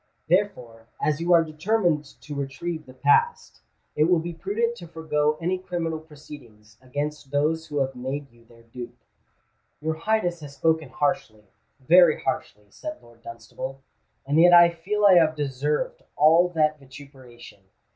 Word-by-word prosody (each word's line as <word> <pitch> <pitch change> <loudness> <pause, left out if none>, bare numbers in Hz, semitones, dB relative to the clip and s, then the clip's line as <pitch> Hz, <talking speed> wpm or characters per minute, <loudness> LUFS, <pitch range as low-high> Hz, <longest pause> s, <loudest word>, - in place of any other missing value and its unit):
Therefore, 125 - -1
as 150 +1 0
you 175 +1 0
are 170 -1 +6
determined 160 0 0 0.2
to 150 - -8
retrieve 150 +3 -5
the 130 - -13
past, 465 - +1 0.3
it 150 - +3
will 175 +1 +3
be 170 +1 -4
prudent 210 +7 -2
to 170 - -10
forego 155 -2 -1
any 180 +2 -1
criminal 170 -3 -3
proceedings 130 -8 -15
against 145 +2 -5
those 155 +3 0
who 145 - -5
have 135 0 -1
made 135 +2 -5
you 120 0 -23
their 115 0 -20
dupe." 120 +1 -10 0.8
"Your 160 +1 -2
Highness 175 0 -1
has 145 -2 -11
spoken 160 -1 0
harshly—very 145 - +1
harshly," 105 -5 -4
said 310 - -7
Lord 120 -1 -20
Dunstable; 115 +4 -8 0.4
"and 145 +3 +1
yet 175 +1 +7
I 175 0 +8
feel 205 +5 -1
I 185 -3 +8
have 160 -1 +2
deserved 145 0 -2
all 165 +4 +5
that 155 -3 +1
vituperation. 130 -5 -14
150 Hz, 150 wpm, -24 LUFS, 135-170 Hz, 0.8 s, I